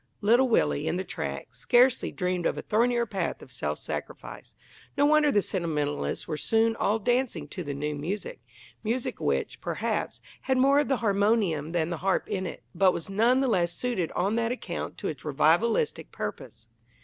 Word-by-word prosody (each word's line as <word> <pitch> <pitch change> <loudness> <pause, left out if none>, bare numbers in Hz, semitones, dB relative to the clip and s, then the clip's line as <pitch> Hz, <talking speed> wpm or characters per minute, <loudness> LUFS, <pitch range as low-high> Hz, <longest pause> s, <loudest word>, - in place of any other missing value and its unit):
Little 240 +5 +4
Willie, 75 - +2
in - - 0
the 185 - -2
tracts, - - -6
scarcely 250 0 +3
dreamed 180 -2 -1
of - - -2
a - - -4
thornier 235 +2 +2
path 195 -4 -3
of - - -14
self - - -3
sacrifice. - - -7 0.4
No 285 - +4
wonder 300 0 +4
the 205 -5 +3
sentimentalists 150 -5 -2
were 155 - -3
soon 225 +5 +2
all 215 0 +1
dancing 245 +3 0
to 180 - -5
the 140 -2 -4
new 150 +2 -2
music 195 - -5 0.4
music 235 +3 -2
which, - - -1
perhaps, - - -2 0.2
had 265 -1 0
more 275 +2 +5
of 295 - +1
the 270 - +1
harmonium 200 -7 +2
than 170 -1 0
the 170 - -2
harp 190 +3 0
in 185 -1 -2
it, 145 - -8
but 185 +1 +4
was 170 +3 -5
none 235 +6 +3
the 270 - +2
less 175 -7 +1
suited 190 -5 -2
on 195 +4 0
that 230 0 0
account 250 - -5
to - - -4
its - - -5
revivalistic 470 0 +1
purpose. - - -7
205 Hz, 185 wpm, -27 LUFS, 175-245 Hz, 0.4 s, more